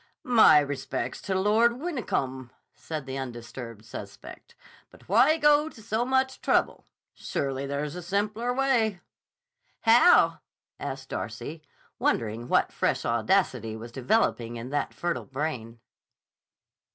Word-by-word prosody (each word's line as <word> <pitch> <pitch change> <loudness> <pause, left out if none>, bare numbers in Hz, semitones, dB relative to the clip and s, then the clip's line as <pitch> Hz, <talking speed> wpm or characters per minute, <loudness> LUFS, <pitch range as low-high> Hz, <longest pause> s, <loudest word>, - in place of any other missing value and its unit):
"My 225 -11 +7
respects 140 -4 -2
to 190 -1 -1
Lord 220 +4 +3
Wyncombe," 135 - -3 0.2
said 155 -3 -6
the 135 0 -5
undisturbed 120 -3 -8
suspect. - - -10 0.3
"But - - -19
why 310 +1 +5
go 295 0 +4
to 235 - -16
so 220 +2 -1
much 260 0 0
trouble? - - +1 0.3
Surely 135 0 -3
there's 140 +2 -3
a 180 - -5
simpler 210 +6 -1
way." 245 -7 +1 0.8
"How?" 240 +10 +5 0.4
asked 135 0 -6
Darcy, 120 - -5 0.4
wondering 115 +2 -1
what - - +2
fresh - - 0
audacity 115 - +1
was 115 +1 -9
developing 120 - 0
in 120 +3 -7
that 145 - -1
fertile 175 -1 -3
brain. 130 -5 -4
150 Hz, 120 wpm, -27 LUFS, -, 0.8 s, My